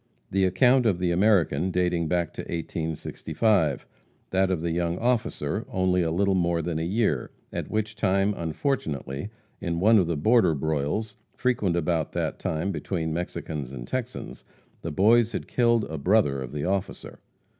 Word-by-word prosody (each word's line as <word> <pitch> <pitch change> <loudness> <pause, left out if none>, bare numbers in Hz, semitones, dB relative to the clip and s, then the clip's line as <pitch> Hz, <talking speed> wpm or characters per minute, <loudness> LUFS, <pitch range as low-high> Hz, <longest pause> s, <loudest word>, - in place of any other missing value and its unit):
The 95 0 +3
account 120 +7 +4
of 95 -5 +2
the 90 -1 0
American 90 -3 +3
dated 90 -3 0
back 85 -2 0
to - - -5
1865 80 - -1 0.5
that 95 0 +2
of 90 -4 0
the 85 0 -1
young 85 0 -1
officer 110 -6 -1
only 95 -5 +1
a 85 - +1
little 95 +4 +1
more 85 -2 +1
than 80 -1 -2
a - - -2
year, 90 - 0 0.2
at - - -4
which 110 0 -2
time, 100 -1 +2
unfortunately, 80 - -3 0.3
in 85 -2 -2
one 110 +4 +6
of 90 - +1
the 85 -2 -1
border 95 0 +4
broils, 80 - -2 0.2
frequent 115 -9 +1
about 85 -2 0
that - - -2
time 80 +5 -1
between 80 0 -3
Mexicans 80 -5 -4
and - - -7
Texans, 125 -1 -5 0.4
the 85 - -4
Boys 115 +7 +4
had - - -4
killed 120 -2 +2
a 80 -5 -5
brother 75 -5 +2
of 65 -1 -6
the 75 +1 -3
officer. 95 +1 -3
90 Hz, 165 wpm, -26 LUFS, 80-105 Hz, 0.5 s, one